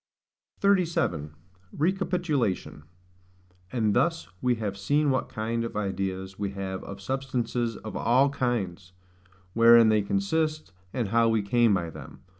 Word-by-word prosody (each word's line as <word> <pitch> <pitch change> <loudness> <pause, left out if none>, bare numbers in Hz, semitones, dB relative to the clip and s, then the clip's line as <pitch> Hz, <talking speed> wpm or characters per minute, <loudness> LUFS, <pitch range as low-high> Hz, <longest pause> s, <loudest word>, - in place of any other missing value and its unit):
37. 165 - +1 0.4
Recapitulation. 165 - -1 0.9
And 110 -4 +1
thus 165 +5 +1
we 125 -1 +2
have 105 -3 -3
seen 145 +9 +1
what 130 - -1
kind 115 +2 -2
of 115 - -5
ideas 95 -1 -3
we 100 -1 -1
have 95 -1 -5
of 100 - -8
SUBSTANCES 120 -1 -2
OF 110 - -8
ALL 130 +5 +3
KINDS, 100 -9 -2 0.6
wherein 115 0 +7
they 110 -1 +3
consist, 160 - -1 0.2
and 120 -4 -2
how 115 +1 +3
we 110 -2 +1
came 115 0 +3
by 85 -3 -3
them. - - -12
115 Hz, 130 wpm, -27 LUFS, 100-135 Hz, 0.9 s, wherein